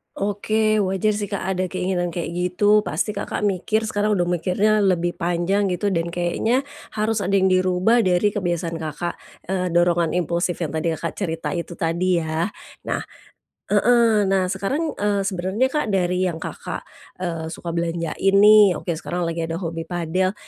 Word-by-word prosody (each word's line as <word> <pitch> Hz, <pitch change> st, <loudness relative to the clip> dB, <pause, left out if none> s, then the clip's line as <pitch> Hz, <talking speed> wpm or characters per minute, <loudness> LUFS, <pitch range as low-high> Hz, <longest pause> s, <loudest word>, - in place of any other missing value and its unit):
Oke. 215 Hz, +2 st, 0 dB
Wajar 195 Hz, +3 st, 0 dB
sih 205 Hz, -1 st, -4 dB
Kak, 200 Hz, -, -1 dB, 0.2 s
ada 185 Hz, 0 st, 0 dB
keinginan 180 Hz, -1 st, -1 dB
kayak 170 Hz, 0 st, -4 dB
gitu, 205 Hz, +4 st, +3 dB
pasti 210 Hz, -1 st, -2 dB
Kakak 205 Hz, +1 st, -2 dB
mikir 215 Hz, +3 st, 0 dB
sekarang 210 Hz, +1 st, 0 dB
udah 175 Hz, -, +1 dB
mikirnya 200 Hz, +5 st, +2 dB
lebih 175 Hz, -2 st, +1 dB
panjang 180 Hz, +3 st, 0 dB
gitu 205 Hz, +3 st, -1 dB
dan 170 Hz, -3 st, -1 dB
kayaknya 220 Hz, +10 st, 0 dB, 0.2 s
harus 215 Hz, -1 st, -1 dB
ada -, -, -1 dB
yang 190 Hz, -, +3 dB
dirubah 185 Hz, +5 st, +3 dB
dari 185 Hz, +2 st, +3 dB
kebiasaan 175 Hz, -4 st, -2 dB
Kakak, 160 Hz, +2 st, -4 dB, 0.3 s
eee, 185 Hz, -1 st, -1 dB
dorongan 175 Hz, -1 st, +2 dB
impulsif 175 Hz, 0 st, -1 dB
yang 160 Hz, -2 st, -3 dB
tadi 160 Hz, +1 st, 0 dB
Kakak 170 Hz, -, -4 dB
cerita 170 Hz, -2 st, -3 dB
itu 170 Hz, 0 st, -4 dB
tadi 170 Hz, +2 st, +1 dB
yah. 160 Hz, +4 st, -2 dB, 0.3 s
Nah -, -, -2 dB, 0.7 s
heeh, 230 Hz, -4 st, +4 dB
nah 190 Hz, -1 st, +1 dB
sekarang, 275 Hz, -, -1 dB
eee, 205 Hz, -1 st, +1 dB
sebenernya 190 Hz, +4 st, 0 dB
Kak, 300 Hz, -3 st, 0 dB
dari 185 Hz, -2 st, +1 dB
yang 170 Hz, -, -4 dB
Kakak, -, -, -5 dB, 0.4 s
eee, 165 Hz, -3 st, -3 dB
suka 170 Hz, +1 st, -6 dB
belanjain 170 Hz, +3 st, -1 dB
nih, 210 Hz, -2 st, +7 dB
oke 175 Hz, -, -3 dB
sekarang 175 Hz, +1 st, -3 dB
lagi 165 Hz, 0 st, -2 dB
ada 165 Hz, -, -3 dB
hobi 165 Hz, -2 st, -4 dB
padel, 180 Hz, +3 st, -1 dB
185 Hz, 165 wpm, -22 LUFS, 170-205 Hz, 0.7 s, nih